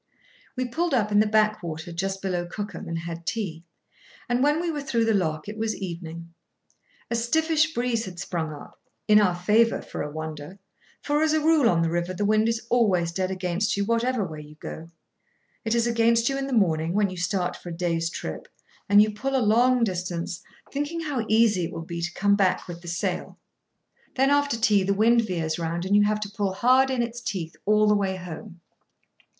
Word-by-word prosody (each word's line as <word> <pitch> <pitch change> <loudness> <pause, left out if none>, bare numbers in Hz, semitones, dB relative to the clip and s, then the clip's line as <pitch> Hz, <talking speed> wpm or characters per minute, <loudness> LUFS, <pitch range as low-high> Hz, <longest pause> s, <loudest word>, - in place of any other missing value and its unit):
We 255 -1 -1
pulled 315 +5 -1
up 210 -4 +1
in 205 - +4
the 215 - +4
backwater, 210 -7 0
just 195 +3 -3
below 180 -2 -1
Cookham, 205 +1 -6
and 165 0 -3
had 170 0 -6
tea; 175 -3 -4 0.6
and, 245 0 +1
when 295 +3 +3
we 340 -1 -1
were 295 -2 -4
through 235 -5 0
the 225 - +2
lock, 155 -5 -1
it 215 +1 -7
was 220 0 -1
evening. 170 -2 -7 0.8
A - - +1
stiffish 320 +7 +2
breeze 240 -2 0
had 180 -2 -9
sprung 165 -4 -3
up—in 210 +7 0
our 185 -4 +2
favour, 215 +6 +3
for - - -7
a - - -3
wonder; 155 +3 -7 0.5
for, 295 +1 +1
as 315 0 +3
a 315 - +3
rule 310 -5 +4
on 165 -2 +2
the 165 - 0
river, 175 +2 -2
the 205 - -1
wind 215 +2 +3
is 230 0 -2
always 190 -8 +2
dead 185 +1 -1
against 185 +2 -1
you 200 - 0
whatever 230 0 +1
way 155 -3 -7
you 150 0 -13
go. 160 +2 -8 0.7
It 225 +1 0
is 235 0 +2
against 230 0 +3
you 270 - -1
in 275 0 -2
the - - -5
morning, 170 -8 +2
when 205 -1 +2
you 185 - -7
start 180 0 -1
for 175 - -9
a 165 - -6
day's 165 -2 0
trip, 80 - -6 0.4
and 205 +1 +7
you 215 - -1
pull 270 +6 -2
a 240 -5 +2
long 250 +1 +4
distance, 180 -4 -3 0.3
thinking 295 +4 -3
how 280 -8 -2
easy 215 -5 +3
it - - -6
will 165 - -6
be 170 0 -5
to 175 +1 -2
come 200 +1 +3
back 195 -2 +1
with 170 -1 -8
the 175 - -12
sail. 170 +1 -3 0.8
Then, 270 +1 +3
after 285 -3 +2
tea, 210 -3 +3
the 200 +1 0
wind 230 +3 +4
veers 170 -6 -2
round, 170 +1 -2
and 200 +2 +2
you 205 0 +5
have 210 0 +1
to 205 -1 -4
pull 200 -2 -1
hard 255 +6 +4
in 255 -2 0
its 235 +1 -5
teeth 180 -8 -4
all 210 0 +4
the 210 - +4
way 195 -2 0
home. 180 0 -9
205 Hz, 210 wpm, -25 LUFS, 175-235 Hz, 0.8 s, and